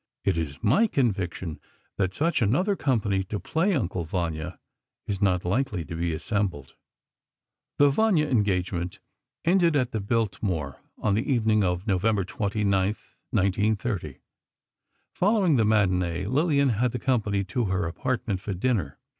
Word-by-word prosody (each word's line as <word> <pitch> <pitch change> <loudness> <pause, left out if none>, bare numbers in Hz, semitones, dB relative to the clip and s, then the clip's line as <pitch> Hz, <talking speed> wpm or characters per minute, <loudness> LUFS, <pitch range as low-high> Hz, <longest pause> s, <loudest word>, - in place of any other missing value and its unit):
It - - +1
is 80 -4 -3
my 140 - +4
conviction 95 - -1 0.4
that 95 -1 0
such 165 -1 +1
another 180 - +2
company 105 - 0
to 105 +2 -4
play 175 +4 0
"Uncle 95 - -1
Vanya" 85 0 -3 0.5
is 100 -2 -3
not 90 -3 +2
likely 105 - -1
to 80 - -6
be 85 +1 -1
assembled. 85 - -2 1.0
The 145 0 +5
"Vanya" 185 -2 +3
engagement 90 - 0 0.5
ended 170 -2 +4
at 125 -3 +1
the 110 - -2
Biltmore 100 - -2 0.2
on 105 - 0
the 115 +7 0
evening 110 -4 +3
of 90 +1 -1
November 100 0 +1
29, 105 +3 -2 0.6
1930. 100 - 0 1.0
Following 190 - +3
the 110 - +3
matinée, 90 -4 +1
Lillian 140 +2 +2
had 120 +1 +1
the - - -1
company 110 -6 0
to 105 +5 -2
her 95 -3 0
apartment, 100 +2 -2
for 100 -1 -4
dinner. 95 - -1
105 Hz, 140 wpm, -26 LUFS, 90-125 Hz, 1.0 s, The